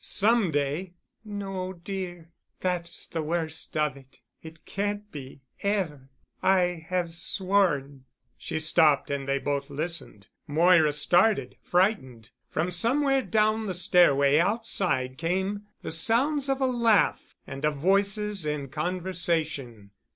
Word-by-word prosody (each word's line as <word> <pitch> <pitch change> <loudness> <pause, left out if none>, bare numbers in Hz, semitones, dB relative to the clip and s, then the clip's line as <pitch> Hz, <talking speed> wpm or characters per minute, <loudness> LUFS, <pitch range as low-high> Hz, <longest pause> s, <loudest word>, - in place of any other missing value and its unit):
Some 220 -1 +3
day——" 150 +5 -2 0.3
"No, 195 -3 -5
dear. 175 -2 -7 0.3
That's 175 -2 -3
the 165 - -4
worst 160 0 -3
of 150 -3 +1
it. 135 -1 -18 0.2
It 160 0 -13
can't 205 +1 -3
be, 135 -2 -10 0.2
ever. 170 -10 -2 0.3
I 180 -3 +1
have 180 -2 -1
sworn——" 170 -8 0 0.3
She - - -5
stopped 155 -3 +3
and 140 -1 -3
they 135 0 +1
both 140 0 -2
listened, 150 - -5 0.2
Moira 160 0 +4
started—frightened. 175 - +1 0.2
From 170 +3 -1
somewhere 270 +9 +2
down 215 -2 +1
the 185 - -2
stairway 155 -6 +4
outside 175 - 0
came 190 +5 -2 0.2
the - - -4
sounds 265 - +3
of 270 0 0
a - - +3
laugh 235 -5 +1
and 135 +1 -8
of 150 0 +1
voices 200 +3 +1
in 150 -2 -3
conversation. 155 - -3
175 Hz, 120 wpm, -27 LUFS, 150-200 Hz, 0.3 s, Moira